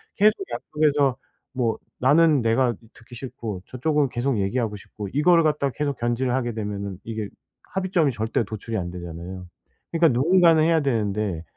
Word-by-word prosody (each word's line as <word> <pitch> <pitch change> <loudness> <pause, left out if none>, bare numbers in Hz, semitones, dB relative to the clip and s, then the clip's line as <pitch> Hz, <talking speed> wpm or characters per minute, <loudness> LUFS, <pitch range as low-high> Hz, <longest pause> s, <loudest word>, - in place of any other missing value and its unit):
계속 210 +2 +5 0.2
양쪽에서 145 -3 +1 0.4
뭐 120 -3 0 0.2
나는 150 +1 +4
내가 120 +1 +2 0.2
듣기 115 +1 -14
싫고 115 -6 -6
저쪽은 145 +2 0
계속 125 0 -1
얘기하고 105 +2 -1
싶고 100 +1 -8
이거를 165 +3 +4
갖다가 140 -4 +1
계속 145 -3 -2
견제를 120 +1 0
하게 120 -3 -1
되면은 100 -3 -4
이게 110 -2 -4 0.5
합의점이 185 -6 +1
절대 110 +1 -1
도출이 110 +2 -5
안 90 -3 -3
되잖아요. 90 +1 -8 0.4
그러니까 165 -1 +4
누군가는 170 -1 +5
해야 165 -1 +3
되는데 105 - -1
125 Hz, 370 characters per minute, -24 LUFS, 105-150 Hz, 0.5 s, 계속